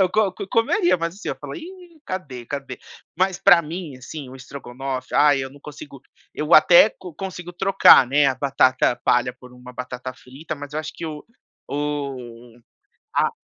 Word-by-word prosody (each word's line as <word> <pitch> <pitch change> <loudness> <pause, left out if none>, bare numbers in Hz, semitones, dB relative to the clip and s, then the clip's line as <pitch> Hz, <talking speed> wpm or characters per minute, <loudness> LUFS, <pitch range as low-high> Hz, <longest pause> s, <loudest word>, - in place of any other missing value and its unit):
eu 185 - +4
co 215 -3 +2
co 190 - -7
comeria, 345 - +2
mas 165 0 -3
assim, 205 - -8
eu - - -2
falo: - - -8
“Ih, 350 -1 -11
cadê, 135 -11 -6
cadê?”. 135 -3 -6 0.4
Mas, 185 0 +1
pra 175 -3 +6
mim, 160 -3 -7
assim, 135 +2 -9
o 130 - -11
estrogonofe, 130 0 -7
ai 145 -2 +4
eu 130 - -6
não 140 +1 -16
consigo 145 -2 -11 0.3
eu 150 +2 +2
até 175 +6 +7
co 180 -4 -12
consigo 180 0 -7
trocar, 190 -7 +6
né, 145 +2 +3
a 135 - +2
batata 130 -2 +2
palha 125 +1 +2
por 125 -1 -15
uma 125 0 -13
batata 125 +1 -6
frita, 135 +6 -8
mas 145 0 -10
eu 155 - -2
acho 155 0 -7
que 165 - -6
o 150 -1 -7 0.5
o 130 -5 -5 0.6
a - - +2
145 Hz, 185 wpm, -22 LUFS, 130-180 Hz, 0.6 s, até